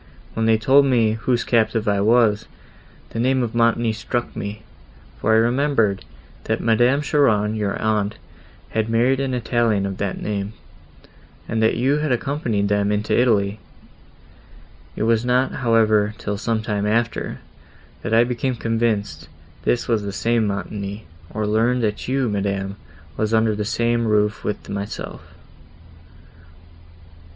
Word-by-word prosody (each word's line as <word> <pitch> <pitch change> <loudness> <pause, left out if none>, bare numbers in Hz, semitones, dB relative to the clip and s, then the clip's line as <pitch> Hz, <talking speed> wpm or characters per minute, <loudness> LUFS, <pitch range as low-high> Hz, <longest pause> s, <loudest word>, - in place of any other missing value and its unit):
When 115 0 0
they 110 -1 +4
told 135 +6 +4
me, 115 -4 +3
whose 115 +2 0
captive 115 -2 +1
I 100 -1 +2
was, 110 -1 +3 0.6
the 115 - -4
name 130 +1 +2
of 115 - -3
Montoni 115 -1 +2
struck 120 +2 -3
me, 105 +1 -6 0.6
for - - +1
I - - +5
remembered, 115 -4 +2 0.4
that - - 0
Madame 120 +5 +2
Cheron, 110 -8 +2
your 105 -3 -2
aunt, 105 -1 0 0.5
had 110 0 -1
married 120 +4 +2
an 135 -2 -1
Italian 115 -4 +1
of 95 -1 -4
that 100 -2 -3
name, 105 0 -3 0.9
and 115 0 -1
that 110 - +2
you 135 +5 +2
had 150 -2 -1
accompanied 120 -5 -1
them 100 0 +1
into 105 +1 0
Italy. 105 -4 +2 1.4
It - - -2
was 115 0 +2
not, 125 +2 +2
however, 110 -3 +2
till 105 - -3
some 110 -1 -1
time 105 -1 -1
after, 115 +2 -1 0.6
that - - -4
I 115 +1 +5
became 125 +1 -2
convinced 115 -2 -1 0.4
this 120 - +1
was 115 -3 +1
the 100 -1 -4
same 115 +3 +1
Montoni, 100 +1 -5 0.2
or 110 +3 -3
learned 115 +4 +1
that 105 -1 -2
you, 130 0 +1
madam, 100 -2 -2 0.4
was 110 +1 +1
under 110 -1 +3
the 105 0 -3
same 115 +1 0
roof 105 0 +1
with 105 - -4
myself. 100 +1 -5
110 Hz, 145 wpm, -21 LUFS, 105-120 Hz, 1.4 s, I